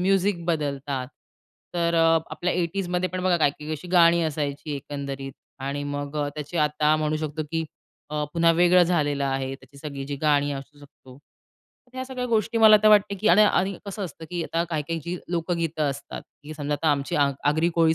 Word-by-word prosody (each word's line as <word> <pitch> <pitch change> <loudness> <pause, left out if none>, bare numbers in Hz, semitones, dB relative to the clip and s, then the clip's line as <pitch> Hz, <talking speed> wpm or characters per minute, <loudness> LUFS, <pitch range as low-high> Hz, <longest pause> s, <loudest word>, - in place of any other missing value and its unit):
Music 190 -1 +1
बदलतात. 140 -5 -2 0.7
तर 170 -1 +1
अ, 165 0 +5
आपल्या 175 +3 -2
'80जमध्ये 180 +1 -1
पण 185 0 -4
बघा 185 -1 +3
काही-काही 150 -1 0
अशी 155 +4 -6
गाणी 170 -1 +5
असायची 150 -1 -3
एकंदरीत 140 -1 -6 0.3
आणि 140 +1 -3
मग 145 +1 -4
अ, 145 -1 0
त्याची 150 +3 -6
आता 150 0 +2
म्हणू 155 0 0
शकतो 155 0 -3
की 165 -1 -1 0.5
अ, 150 0 -1
पुन्हा 170 0 +4
वेगळं 175 +1 +5
झालेलं 145 -5 +1
आहे, 135 0 -2
त्याची 135 +1 -17
सगळी 140 -2 -6
जी 145 - -4
गाणी 145 -1 +3
असू 140 +1 -8
शकतो. 135 -2 -16 0.7
ह्या 260 0 -5
सगळ्या 255 -1 -4
गोष्टी 230 0 0
मला 220 -1 +8
आता 215 +1 +4
वाटते 205 -1 +5
की 215 - +2
आणि 215 - +7
आणि 195 -2 +2
कसं 200 0 -4
असतं 160 -1 -9
की 175 -1 -2
आता 165 0 -1
काही-काही 160 +1 -2
जी 175 +1 -3
लोकगीतं 165 -3 -1
असतात 140 - -7 0.2
की 155 +1 -8
समजा 145 0 -2
आता 155 +3 0
आमची 140 -1 -1
आग 140 -1 +3 0.2
आगरी 160 +3 +2
कोळी 165 -1 +4
155 Hz, 185 wpm, -25 LUFS, 145-175 Hz, 0.7 s, मला